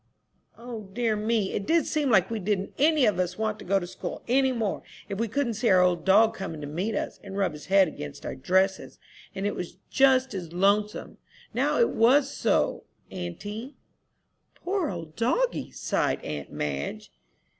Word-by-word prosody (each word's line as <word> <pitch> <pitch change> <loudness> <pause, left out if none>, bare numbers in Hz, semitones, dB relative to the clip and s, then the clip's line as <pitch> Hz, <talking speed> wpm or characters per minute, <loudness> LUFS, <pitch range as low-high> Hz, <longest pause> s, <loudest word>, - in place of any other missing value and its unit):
"O 230 -4 -8
dear 230 -1 +1
me, 210 -1 0
it 200 - -3
did 330 0 +3
seem 300 -3 0
like 195 -3 +4
we 225 - -2
didn't 200 0 -1
any 300 -1 +4
of 205 -5 +2
us 180 0 -1
want 215 -1 -1
to - - -10
go 195 +2 +2
to 185 - -2
school 175 - -7
any 265 +2 +3
more, 225 -5 -2 0.3
if 195 - -4
we 230 - +1
couldn't 250 +1 -1
see 230 +2 0
our 185 -1 +6
old 175 -2 +1
dog 215 +4 +5
coming 165 -5 -6
to - - -5
meet 180 +9 -2
us, - - -3
and 195 -1 -7
rub 195 -5 +1
his 150 -1 -10
head 195 0 +5
against 75 - -8
our - - -3
dresses. 190 +8 0 0.4
And 195 - -3
it 205 - 0
was 180 - -6
just 265 -2 +4
as 175 -4 -6
lonesome, 205 +4 +1 0.3
now - - +1
it 475 - +3
was 270 +5 +4
so, - - +1 0.3
auntie." 205 - -6 0.8
"Poor 375 -1 -1
old 165 -4 -7
doggie!" - - 0
sighed - - -1
aunt 75 -2 -5
Madge. 70 -1 -4
205 Hz, 185 wpm, -27 LUFS, 180-240 Hz, 0.8 s, our